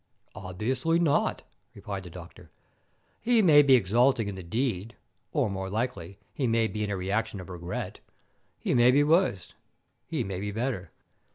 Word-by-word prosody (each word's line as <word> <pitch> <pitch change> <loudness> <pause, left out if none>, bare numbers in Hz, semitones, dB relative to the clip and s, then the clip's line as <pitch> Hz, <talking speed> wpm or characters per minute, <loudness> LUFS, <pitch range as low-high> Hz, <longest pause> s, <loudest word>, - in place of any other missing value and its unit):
"Obviously 115 - -1
not," 165 -4 +1 0.3
replied 100 -2 -6
the 90 - -10
doctor. 85 -1 -12 0.7
"He 230 -1 +3
may 150 -5 +7
be 140 -2 +6
exulting 120 +2 +2
in 100 - -4
the 95 - -7
deed, 110 +2 -2 0.4
or, - - +1
more 95 -1 -4
likely, 100 -4 -3 0.2
he 130 - -1
may 115 0 +2
be 105 -1 -3
in 105 - -2
a 100 - -2
reaction 100 +3 -2
of 95 - -9
regret. 90 0 -5 0.6
He - - -1
may 120 0 +5
be 140 +3 +5
worse, 155 - +1 0.5
he - - -2
may 95 -1 -4
be 105 +1 -3
better. 110 -5 -3
110 Hz, 165 wpm, -28 LUFS, 95-130 Hz, 0.7 s, may